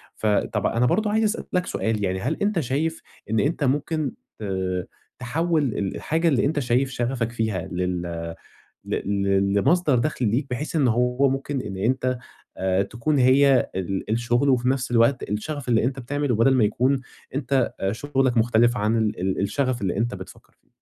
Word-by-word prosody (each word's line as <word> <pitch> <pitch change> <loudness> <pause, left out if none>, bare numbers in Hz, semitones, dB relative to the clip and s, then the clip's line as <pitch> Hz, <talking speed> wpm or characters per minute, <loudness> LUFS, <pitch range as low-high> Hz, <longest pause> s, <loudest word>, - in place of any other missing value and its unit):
فطَب 105 -2 0
أنا 120 +2 +2
برضو 210 - +2
عايز 220 +1 +2
أسأل 215 +1 0
لك 180 0 +1
سؤال، 110 -2 -1
يعني 95 0 -1
هل 130 +11 -2
أنت 205 -3 +1
شايف 155 +5 -1 0.3
إن 110 0 +1
أنت 150 +4 0
ممكن 145 +1 0 0.3
ت 110 - -7 0.8
تحوِّل 160 +6 0
ال 105 -7 -2
الحاجة 165 +2 0
اللي 135 -5 +3
أنت 145 +1 0
شايف 125 +1 +1
شغفك 120 -2 -2
فيها 110 -6 -2
لل 90 0 -1 0.8
ل - - -2
ل 100 0 +1
لمصدر 150 - +3
دخل 125 -4 -1
ليك، 125 +7 0
بحيث 140 +7 -4
إن 140 -5 +3
هو 125 +4 +2
ممكن 135 0 -2
إن 100 -4 -6
أنت 130 +4 0 0.4
آآ، 95 0 +1
تكون 120 +8 -1
هي 135 +1 +4
ال 95 +2 -3
الشغل 120 +4 +1
وفي 125 -1 +2
نَفس 130 -2 -1
الوقت 120 +2 +3
الشغف 125 +6 -4
اللي 115 -2 +3
أنت 135 +2 -1
بتعمله، 140 0 -1
بدل 115 +4 +4
ما 125 - +4
يكون 130 +6 +1 0.3
أنت 140 -3 0 0.2
شغلك 130 0 0
مختلف 120 +1 +3
عن 110 +1 +1
ال 110 -4 0
ال 95 +1 -1
الشغف 125 +3 -1
اللي 95 -1 -1
أنت 115 0 -1
بتفكر 95 -1 -12
فيه؟ - - -41
125 Hz, 175 wpm, -24 LUFS, 110-140 Hz, 0.8 s, هي